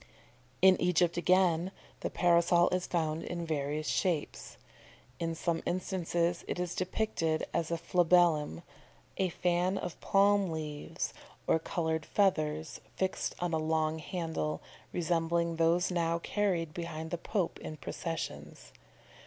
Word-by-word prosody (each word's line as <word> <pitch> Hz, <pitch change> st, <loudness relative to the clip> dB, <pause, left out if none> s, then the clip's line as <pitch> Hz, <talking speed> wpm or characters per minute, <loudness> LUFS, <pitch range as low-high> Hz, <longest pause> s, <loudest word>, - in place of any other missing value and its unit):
In 190 Hz, -1 st, +7 dB
Egypt 175 Hz, -1 st, +3 dB
again, 180 Hz, 0 st, +3 dB, 0.3 s
the -, -, -2 dB
Parasol 170 Hz, 0 st, +4 dB
is 185 Hz, 0 st, -1 dB
found 160 Hz, -2 st, -1 dB
in 170 Hz, -1 st, -4 dB
various 150 Hz, -1 st, -2 dB
shapes. 175 Hz, -6 st, -1 dB, 0.6 s
In 165 Hz, -1 st, -2 dB
some 165 Hz, 0 st, -1 dB
instances 175 Hz, -1 st, -1 dB
it -, -, -2 dB
is 180 Hz, -1 st, -2 dB
depicted 185 Hz, -4 st, -1 dB
as 165 Hz, -2 st, 0 dB
a 170 Hz, -, 0 dB
flabellum, 170 Hz, -, +3 dB, 0.5 s
a 190 Hz, -1 st, +1 dB
fan 180 Hz, +2 st, +1 dB
of 180 Hz, -, -5 dB
palm 200 Hz, -1 st, +4 dB
leaves 155 Hz, -2 st, -4 dB, 0.3 s
or 160 Hz, -, +3 dB
coloured 160 Hz, -1 st, -1 dB
feathers 155 Hz, -6 st, +1 dB
fixed 190 Hz, 0 st, -1 dB
on 175 Hz, -1 st, -2 dB
a 160 Hz, -, +2 dB
long 155 Hz, 0 st, 0 dB
handle, 160 Hz, -, -3 dB, 0.3 s
resembling 170 Hz, -1 st, 0 dB
those 170 Hz, +2 st, +3 dB
now 170 Hz, -1 st, +1 dB
carried 170 Hz, -4 st, -1 dB
behind 160 Hz, -1 st, -5 dB
the 175 Hz, -, -1 dB
Pope 190 Hz, -1 st, -1 dB
in 155 Hz, -, -7 dB
processions. 165 Hz, +2 st, -5 dB
170 Hz, 130 wpm, -31 LUFS, 160-180 Hz, 0.6 s, In